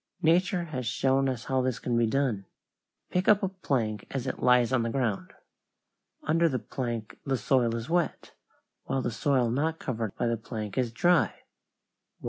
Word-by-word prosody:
Nature 175 Hz, +2 st, +3 dB
has 130 Hz, -7 st, -4 dB
shown 135 Hz, +2 st, +2 dB
us 125 Hz, -2 st, -3 dB
how 130 Hz, -1 st, 0 dB
this 130 Hz, -1 st, -1 dB
can 120 Hz, -, -2 dB
be 115 Hz, -1 st, +3 dB
done. 115 Hz, -6 st, 0 dB, 0.6 s
Pick 180 Hz, +1 st, 0 dB
up 205 Hz, -1 st, +5 dB
a 190 Hz, -, +1 dB
plank 120 Hz, -, -2 dB
as 135 Hz, -2 st, -3 dB
it 130 Hz, -, -4 dB
lies 125 Hz, -1 st, +4 dB
on 130 Hz, -, +3 dB
the 115 Hz, -, -1 dB
ground. 115 Hz, -5 st, -1 dB, 0.9 s
Under 165 Hz, +2 st, +3 dB
the 130 Hz, -, 0 dB
plank 120 Hz, -4 st, -5 dB
the 135 Hz, -2 st, 0 dB
soil 120 Hz, 0 st, +2 dB
is 115 Hz, +1 st, -4 dB
wet, 170 Hz, -1 st, -1 dB, 0.5 s
while 135 Hz, -1 st, -1 dB
the 120 Hz, -, -1 dB
soil 125 Hz, 0 st, +1 dB
not 155 Hz, +6 st, 0 dB
covered 115 Hz, -8 st, -3 dB
by -, -, -1 dB
the 115 Hz, 0 st, +1 dB
plank 110 Hz, -2 st, -6 dB
is 125 Hz, -3 st, 0 dB
dry. 175 Hz, +9 st, +2 dB
130 Hz, 175 wpm, -28 LUFS, 115-145 Hz, 0.9 s, up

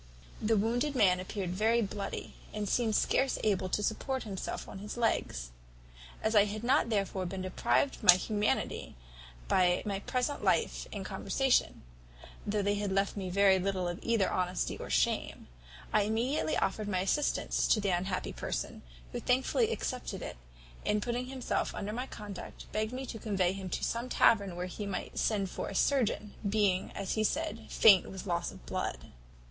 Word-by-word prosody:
The 220 Hz, 0 st, +2 dB
wounded 245 Hz, +7 st, +1 dB
man 185 Hz, -7 st, +4 dB
appeared 185 Hz, -1 st, -4 dB
very 225 Hz, +5 st, +2 dB
bloody, 200 Hz, 0 st, -5 dB, 0.2 s
and 210 Hz, -1 st, -2 dB
seemed 220 Hz, +1 st, +1 dB
scarce 270 Hz, +5 st, +2 dB
able 190 Hz, -3 st, +1 dB
to 210 Hz, -, 0 dB
support 260 Hz, +5 st, -1 dB
himself 195 Hz, -4 st, -5 dB
on 190 Hz, -, -8 dB
his 210 Hz, +4 st, -6 dB
legs. -, -, 0 dB, 0.7 s
As 220 Hz, -, +1 dB
I 205 Hz, -1 st, +7 dB
had 210 Hz, +2 st, -5 dB
not 255 Hz, -1 st, +3 dB
therefore 195 Hz, -3 st, -1 dB
been 185 Hz, +1 st, -4 dB
deprived 185 Hz, +8 st, +1 dB
of -, -, -16 dB
my 180 Hz, -, +11 dB
humanity 210 Hz, +3 st, -1 dB, 0.5 s
by 180 Hz, -1 st, +3 dB
my 200 Hz, -2 st, -1 dB
present 250 Hz, +6 st, -2 dB
life -, -, +1 dB
and -, -, -5 dB
conversation, 270 Hz, -2 st, +1 dB, 0.6 s
though 205 Hz, 0 st, 0 dB
they 205 Hz, +1 st, +2 dB
had 205 Hz, -1 st, -2 dB
left 195 Hz, +1 st, +1 dB
me 190 Hz, -3 st, -3 dB
very 195 Hz, 0 st, +5 dB
little 185 Hz, -1 st, -1 dB
of 175 Hz, 0 st, -4 dB
either 230 Hz, -4 st, +2 dB
honesty 180 Hz, 0 st, -1 dB
or -, -, -7 dB
shame, -, -, 0 dB, 0.5 s
I -, -, +5 dB
immediately 220 Hz, -, 0 dB
offered 205 Hz, +2 st, -1 dB
my 185 Hz, -3 st, 0 dB
assistance 280 Hz, +10 st, +1 dB
to 220 Hz, -, +4 dB
the 200 Hz, -1 st, 0 dB
unhappy 180 Hz, +1 st, -1 dB
person, -, -, -4 dB, 0.3 s
who -, -, -3 dB
thankfully 265 Hz, -, +2 dB
accepted 255 Hz, -, -3 dB
it, -, -, -6 dB, 0.5 s
and, 210 Hz, 0 st, +1 dB
putting 245 Hz, +1 st, -2 dB
himself 260 Hz, -1 st, -2 dB
under 205 Hz, +1 st, -4 dB
my 250 Hz, +3 st, -3 dB
conduct, 205 Hz, -6 st, -8 dB
begged 215 Hz, +1 st, -1 dB
me 260 Hz, +1 st, -4 dB
to 225 Hz, -, -6 dB
convey 190 Hz, -4 st, +1 dB
him 195 Hz, -1 st, -6 dB
to -, -, -3 dB
some 235 Hz, +2 st, -1 dB
tavern, 200 Hz, -8 st, +4 dB
where 180 Hz, +1 st, -3 dB
he 200 Hz, +3 st, -5 dB
might 200 Hz, -, -4 dB
send 200 Hz, -4 st, 0 dB
for -, -, -4 dB
a 200 Hz, -, -7 dB
surgeon, 220 Hz, -4 st, +1 dB, 0.2 s
being, 200 Hz, -3 st, +1 dB
as 195 Hz, -2 st, -3 dB
he 215 Hz, -, +1 dB
said, 220 Hz, +1 st, -2 dB
faint 200 Hz, -5 st, +6 dB
with 190 Hz, +1 st, -7 dB
loss 170 Hz, -2 st, -1 dB
of -, -, -14 dB
blood. -, -, -4 dB
205 Hz, 175 wpm, -31 LUFS, 190-230 Hz, 0.7 s, my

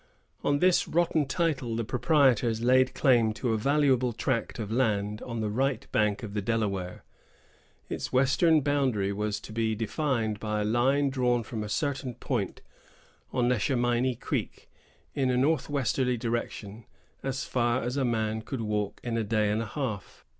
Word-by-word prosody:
On 145 Hz, -, +2 dB
this 180 Hz, +3 st, +3 dB
rotten 165 Hz, -3 st, +1 dB
title 140 Hz, -9 st, -1 dB
the 115 Hz, -, -1 dB
proprietors 125 Hz, -3 st, +2 dB
laid 130 Hz, +1 st, +4 dB
claim 120 Hz, -5 st, +3 dB
to 115 Hz, +1 st, -1 dB
a -, -, +1 dB
valuable 135 Hz, -2 st, +2 dB
tract 115 Hz, +1 st, -2 dB
of 110 Hz, -3 st, -5 dB
land 105 Hz, -4 st, 0 dB
on 115 Hz, -2 st, -4 dB
the 105 Hz, -, -1 dB
right 130 Hz, +2 st, 0 dB
bank 105 Hz, +2 st, +1 dB
of 105 Hz, -2 st, -6 dB
the 105 Hz, -, -1 dB
Delaware. 100 Hz, -4 st, -2 dB, 0.8 s
Its -, -, -4 dB
western 145 Hz, +5 st, +4 dB
boundary 130 Hz, -9 st, +1 dB
was 105 Hz, +1 st, -2 dB
to 110 Hz, -, -10 dB
be 110 Hz, -1 st, 0 dB
defined 115 Hz, -1 st, -1 dB
by 105 Hz, -1 st, -2 dB
a -, -, 0 dB
line 135 Hz, +5 st, +2 dB
drawn 125 Hz, -2 st, +1 dB
from 110 Hz, -1 st, -5 dB
a 105 Hz, -, -6 dB
certain 135 Hz, -1 st, -2 dB
point 120 Hz, -6 st, -3 dB, 0.7 s
on 125 Hz, -2 st, +1 dB
Neshaminey 120 Hz, +1 st, +1 dB
Creek, -, -, -4 dB, 0.4 s
in 135 Hz, -2 st, 0 dB
a 125 Hz, -, +2 dB
north 145 Hz, +2 st, +1 dB
westerly 130 Hz, -2 st, 0 dB
direction, 115 Hz, -2 st, -4 dB, 0.4 s
as 135 Hz, 0 st, -3 dB
far 120 Hz, 0 st, 0 dB
as 125 Hz, +2 st, -2 dB
a 140 Hz, -, +1 dB
man 110 Hz, -2 st, 0 dB
could 125 Hz, +2 st, -5 dB
walk 105 Hz, -2 st, -2 dB
in 115 Hz, -1 st, -2 dB
a 115 Hz, -, 0 dB
day 105 Hz, -1 st, +1 dB
and 110 Hz, +2 st, 0 dB
a 115 Hz, -, -4 dB
half. 110 Hz, -5 st, -5 dB
120 Hz, 170 wpm, -28 LUFS, 110-135 Hz, 0.8 s, laid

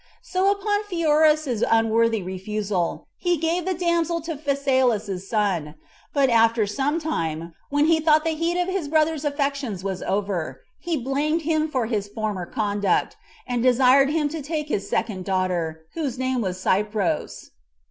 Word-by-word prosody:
So 375 Hz, +2 st, +1 dB
upon 410 Hz, +1 st, 0 dB
Pheroras's 310 Hz, -, +2 dB
unworthy 225 Hz, -1 st, +2 dB
refusal, 190 Hz, 0 st, -3 dB
he 350 Hz, -1 st, +1 dB
gave 330 Hz, +3 st, -1 dB
the 375 Hz, -1 st, 0 dB
damsel 340 Hz, -1 st, 0 dB
to 325 Hz, 0 st, -4 dB
Phasaelus's 260 Hz, -9 st, 0 dB
son; 185 Hz, -9 st, 0 dB, 0.4 s
but 280 Hz, -2 st, +3 dB
after 230 Hz, -2 st, +4 dB
some 275 Hz, +10 st, -1 dB
time, 165 Hz, -, -3 dB, 0.2 s
when 290 Hz, +1 st, +2 dB
he 320 Hz, 0 st, +4 dB
thought 310 Hz, -1 st, +4 dB
the 325 Hz, -, 0 dB
heat 335 Hz, +3 st, -1 dB
of 355 Hz, -, 0 dB
his 375 Hz, -5 st, -2 dB
brother's 310 Hz, 0 st, +1 dB
affections 280 Hz, -, -2 dB
was 190 Hz, -2 st, -3 dB
over, 190 Hz, -9 st, -2 dB, 0.2 s
he 340 Hz, -2 st, -2 dB
blamed 290 Hz, +5 st, -1 dB
him 310 Hz, 0 st, +1 dB
for 255 Hz, -5 st, 0 dB
his 215 Hz, -3 st, -2 dB
former 205 Hz, -4 st, -4 dB
conduct, 205 Hz, -2 st, 0 dB, 0.3 s
and 245 Hz, -2 st, -1 dB
desired 255 Hz, +2 st, +5 dB
him 300 Hz, -1 st, +1 dB
to 320 Hz, +1 st, -5 dB
take 300 Hz, +1 st, -3 dB
his 200 Hz, -7 st, -2 dB
second 200 Hz, -5 st, -1 dB
daughter, 180 Hz, -4 st, -1 dB
whose 285 Hz, -6 st, -3 dB
name 260 Hz, -1 st, 0 dB
was 185 Hz, -3 st, -2 dB
Cypros. 200 Hz, -3 st, -1 dB
260 Hz, 155 wpm, -24 LUFS, 205-315 Hz, 0.4 s, desired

